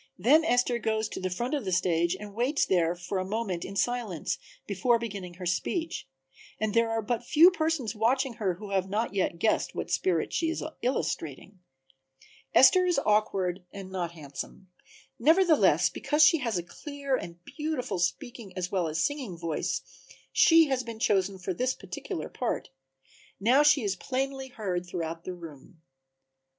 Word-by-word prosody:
Then 300 +8 +5
Esther 245 -4 +2
goes 220 -1 0
to - - -6
the 185 - -2
front 240 +10 -3
of 285 -4 -1
the 190 - -3
stage 175 -1 +2
and 205 -1 -9
waits 250 +7 +1
there 175 -2 +2
for 180 +2 -3
a - - -1
moment 195 -3 -3
in 195 - -7
silence 220 -5 -1 0.3
before 220 +5 +2
beginning 200 -6 -6
her 180 0 -7
speech, 320 - -2 0.5
and 215 -1 -1
there 230 0 +3
are 225 0 -1
but 240 +2 -2
few 320 +8 +6
persons 315 - -1
watching 250 +4 +1
her 185 -4 +1
who 205 +2 -9
have 190 -1 0 0.2
yet 185 -3 0
guessed 215 +6 +1
what - - -4
spirit 175 -4 0
she 330 - +1
is 330 - -3 0.2
illustrating. 185 - -3 1.0
Esther 270 +9 +7
is 355 - +2
awkward 195 -4 +1
and 195 -1 -9
not 175 -3 -3
handsome; 155 +4 -8 0.5
nevertheless, 325 +5 +5
because 300 +1 +2
she 330 +1 +6
has 230 -7 -1
a 175 - -2
clear 280 - -4
and 170 -8 -6
beautiful 300 - -3
speaking 195 +3 -3
as 180 0 -3
well 185 -4 0
as 155 0 -2
singing 255 - -2
voice 165 -2 -2 0.5
she 330 -1 +7
had 265 -3 -1
been 230 -2 -7
chosen 195 -3 +1
for 185 0 -3
this 255 +7 0
particular 395 -8 -6
part. 245 - -3 0.7
Now 245 +8 +5
she 295 -3 +5
is 200 -2 0
plainly 265 +4 -3
heard 185 -7 -4
throughout 165 -2 -5
the 185 - -4
room. 165 0 -13
215 Hz, 165 wpm, -28 LUFS, 180-260 Hz, 1.0 s, Esther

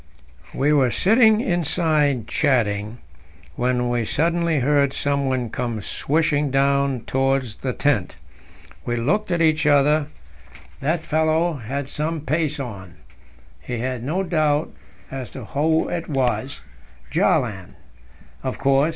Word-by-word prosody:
We 145 +3 +2
were 135 -4 +4
sitting 220 - +4
inside 155 - +1
chatting, 110 -6 0 0.6
when 125 0 0
we 120 -1 0
suddenly 165 +5 0
heard 140 0 +2
someone 135 -4 -1
come 120 -3 -3
swishing 150 +6 0
down 140 -1 +1
towards 135 -4 -1
the 130 - -3
tent. 125 -7 0 0.7
We 120 - -2
looked 185 - 0
at 170 -2 +1
each 155 -2 +2
other; 145 +1 +3 0.7
that 155 +4 0
fellow 160 +2 +1
had 135 +1 -5
some 155 +2 -3
pace 150 +1 -1
on. 100 -9 -7 0.7
We 120 - -2
had 125 0 -3
no 170 +9 -1
doubt 155 -4 0 0.4
as 130 -4 -6
to - - -7
who 160 +3 +1
it 170 -1 -4
was 130 -2 -1 0.5
Bjaaland, 95 -7 0 0.7
of 130 -1 -4
course. 140 +2 +3
140 Hz, 125 wpm, -22 LUFS, 125-155 Hz, 0.7 s, were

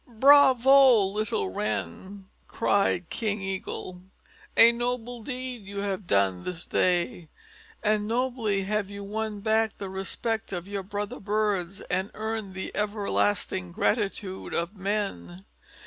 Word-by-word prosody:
"Bravo! 265 -1 +6
little 200 - -1
Wren," 110 - -4 0.2
cried 195 -4 +1
King 215 -2 -1
Eagle. 190 -1 -5 0.6
"A 230 +1 +9
noble 240 0 -3
deed 255 -1 -5
you 200 0 -4
have 200 -2 -3
done 95 -2 +2
this 175 -2 -5
day, 175 -2 0 0.5
and 210 -1 +1
nobly 230 -4 0
have 205 0 -1
you 200 0 -7
won 210 0 -4
back 220 0 +1
the 195 -2 -6
respect 220 +4 -3
of 180 -1 -5
your 200 -1 -3
brother 205 +4 -5
birds 200 -3 -1
and 190 +3 -2
earned 220 -3 -4
the 190 - -5
everlasting 105 - 0
gratitude 190 - -1
of 170 +5 -1
men. 185 - -3
205 Hz, 125 wpm, -27 LUFS, 185-220 Hz, 0.6 s, A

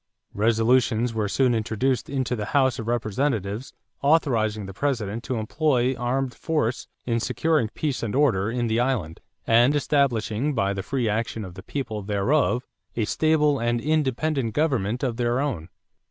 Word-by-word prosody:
Resolutions 115 +2 +2
were 110 -2 -1
soon 130 +2 +2
introduced 115 +2 -1
into 130 -2 -1
the 105 -3 -3
House 130 -4 +2
of 115 - -5
Representatives 115 -1 -1 0.3
authorizing 115 -9 +2
the 95 - -8
President 115 -3 -2
to 130 - -2
employ 125 +2 +1
armed 125 +1 -1
force 150 -7 -1 0.2
in 115 -1 0
securing 135 +2 +1
peace 145 -4 -2
and 115 0 -3
order 110 -9 +2
in 120 +1 -1
the 115 0 +1
island 120 -11 -1 0.3
and 120 +5 +4
"establishing 140 -2 +1
by 100 -3 +1
the 100 - -3
free 125 +4 -1
action 110 0 -2
of 90 - -9
the 95 - -10
people 110 -1 -4
thereof 120 +6 +1 0.3
a 115 - 0
stable 150 +1 +2
and 120 0 0
independent 140 -3 0
government 125 -6 0
of 120 -4 -1
their 120 +1 +1
own." 120 - -2
120 Hz, 155 wpm, -24 LUFS, 110-135 Hz, 0.3 s, and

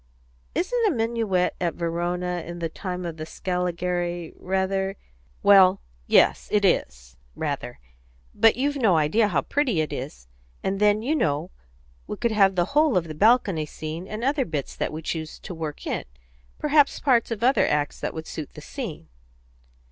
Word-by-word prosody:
Isn't 465 +5 +1
a - - +4
minuet 225 - 0
at 170 -3 0
Verona 175 +1 -2
in 170 +1 -7
the 165 -1 -3
time 180 +1 -5
of 165 -1 -5
the 155 - -5
Scaligeri 175 0 -2
rather 190 +1 -1 0.2
" - - -34
"Well, 195 -1 +7 0.3
yes, - - +4
it 205 -1 +3
is, 60 - -1 0.2
rather. 140 -5 -4 0.6
But 225 - +5
you've 285 +4 0
no 210 -10 +3
idea 160 +9 +3
how 170 -8 +1
pretty 265 - 0
it 155 - -1
is. 125 - -7 0.4
And 195 0 -1
then, 210 +1 +3
you 295 +6 +1
know, 145 - 0 0.6
we - - -5
could 235 -1 0
have 195 -3 +4
the 175 -1 +2
whole 300 -6 +4
of 170 -2 0
the 155 - -6
balcony 195 -4 +3
scene, 155 +4 -6
and 215 +3 -5
other 275 +1 +2
bits 150 - -4
that - - -2
we 155 +1 -6
choose 160 0 -4
to - - -8
work 160 -3 -6
in - - -2 0.5
perhaps 295 -1 +3
parts 250 -5 +2
of 230 -1 -4
other 260 +3 +4
acts 145 -1 0
that - - -4
would 160 0 -5
suit 155 -3 -7
the 150 - -9
scene." 170 - -7
180 Hz, 175 wpm, -25 LUFS, 160-225 Hz, 0.6 s, Well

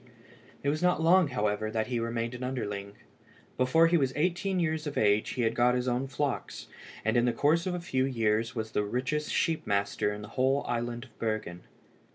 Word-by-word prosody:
It 140 - +1
was 155 +2 -1
not 180 -2 +3
long, 170 +2 +5
however, 110 -4 -1
that 110 0 -1
he 125 -2 -2
remained 115 +1 -2
an 125 - -7
underling. 105 -6 -4 0.6
Before 130 +6 +4
he 170 +1 +4
was 135 -4 +1
eighteen 180 +4 0
years 160 -2 -1
of 145 - -5
age 105 0 +2
he 125 - 0
had 115 0 +1
got 125 +1 +3
his 125 0 -1
own 125 +2 0
flocks, 135 0 -3 0.4
and 110 - +1
in 120 0 +4
the 120 - +3
course 160 +8 +2
of 180 - -1
a - - -3
few 130 -6 0
years 115 -2 0
was 110 -1 -3
the 105 - 0
richest 130 +8 -2
sheep 165 -3 0
master 100 0 0
in 105 0 -6
the 105 - -9
whole 135 +2 +1
island 120 0 -2
of 120 - -23
Bergen. 110 -6 -3
125 Hz, 210 wpm, -29 LUFS, 110-150 Hz, 0.6 s, long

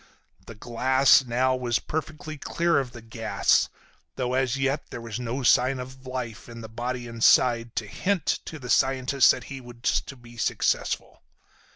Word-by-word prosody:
The 115 - -9
glass 130 +5 +4
now 130 +2 +1
was 120 -2 0
perfectly 155 0 -5
clear 170 +3 +1
of 130 -3 -4
the 120 -2 -11
gas, 115 0 +1 0.5
though 125 -1 -2
as 130 0 +1
yet 135 +2 -1
there - - -7
was 115 -1 -6
no 125 +2 -3
sign 130 +2 +4
of 130 +1 -9
life 125 -4 -5
in 115 0 -9
the 110 - -8
body 120 +2 -4
inside 115 0 +3
to 110 - -2
hint 185 - -1 0.2
to 160 - -7
the 125 -4 -5
scientist 130 0 +3
that - - +2
he 135 -2 -8
was 120 -1 -1
to 140 - -8
be 120 -1 -15
successful. - - -1
125 Hz, 170 wpm, -26 LUFS, 120-135 Hz, 0.5 s, glass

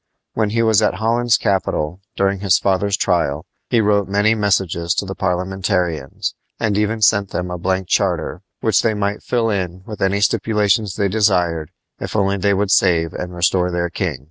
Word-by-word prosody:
When 110 -2 0
he 115 +2 +1
was 110 -2 +4
at - - +1
Holland's 120 +2 +2
capital, 95 -5 -1 0.2
during 100 0 0
his 95 -2 +3
father's 100 +1 0
trial, 85 -5 0 0.2
he 120 -2 +3
wrote 105 -2 +2
many 105 +2 +3
messages 95 -5 0
to - - -1
the - - -5
Parliamentarians, 90 -5 -2 0.3
and 110 -3 0
even 105 +1 0
sent 100 -1 +3
them 90 0 -4
a 90 - -4
blank 95 +1 -1
charter, 90 -4 0 0.2
which 110 - +3
they 110 -2 +1
might 100 0 -2
fill 115 -2 0
in 95 -2 -3
with 105 -2 -8
any 95 +1 +1
stipulations 105 -1 +1
they 100 -2 +1
desired 90 -7 +1 0.3
if - - -6
only 100 -1 +1
they 100 +1 +1
would 100 0 0
save 80 -4 +3
and 90 0 -6
restore 90 +1 +1
their 85 -1 -2
king. 85 -6 -2
100 Hz, 180 wpm, -19 LUFS, 90-105 Hz, 0.3 s, was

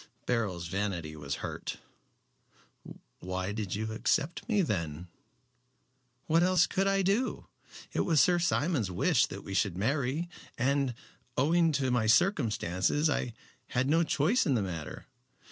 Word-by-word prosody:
Beryl's 100 -8 -1
vanity 85 -4 -3
was 70 -2 -4
hurt. - - -5 1.4
"Why 95 +1 -3
did 105 -3 -3
you 110 +1 -3
accept 155 - -1
me 205 -4 +3
then?" 85 - -3 1.2
"What 165 +1 +3
else 180 -1 +4
could 195 0 0
I 195 0 +2
do? 205 +7 0 0.5
It - - -1
was 160 -4 +3
Sir 175 +3 +4
Simon's 145 - +1
wish 90 - +2
that - - -8
we 95 - -6
should 95 -2 +1
marry, 140 - 0 0.3
and, 135 0 +1 0.4
owing 165 +4 +3
to 135 -3 0
my 115 -3 +1
circumstances, 120 - +2
I 120 -5 -2 0.3
had 125 +2 0
no 160 +4 +3
choice 170 - +2
in 140 - +3
the 110 - +1
matter. 80 -7 -6
125 Hz, 140 wpm, -30 LUFS, -, 1.4 s, else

